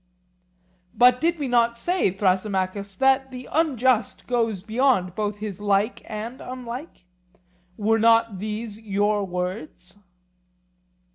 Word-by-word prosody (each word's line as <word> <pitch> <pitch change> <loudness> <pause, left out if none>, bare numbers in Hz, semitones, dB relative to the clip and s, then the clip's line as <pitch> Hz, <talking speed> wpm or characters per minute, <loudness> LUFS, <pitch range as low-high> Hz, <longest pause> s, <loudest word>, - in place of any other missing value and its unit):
But 250 +1 +5
did 335 +1 +1
we 285 -3 -3
not 235 -1 +2
say, 355 - +1
Thrasymachus, 195 +1 -1
that 265 +4 +3
the 255 -1 -9
unjust 260 -8 +1
goes 225 -6 -1
beyond 220 -5 +1
both 210 +1 -2
his 205 -2 -6
like 205 +2 +1
and 225 +4 -6
unlike? 250 - -8 0.7
Were 225 +1 +2
not 230 -3 +3
these 215 +1 -5
your 205 -1 0
words? 180 0 -5
220 Hz, 115 wpm, -24 LUFS, 200-250 Hz, 0.7 s, But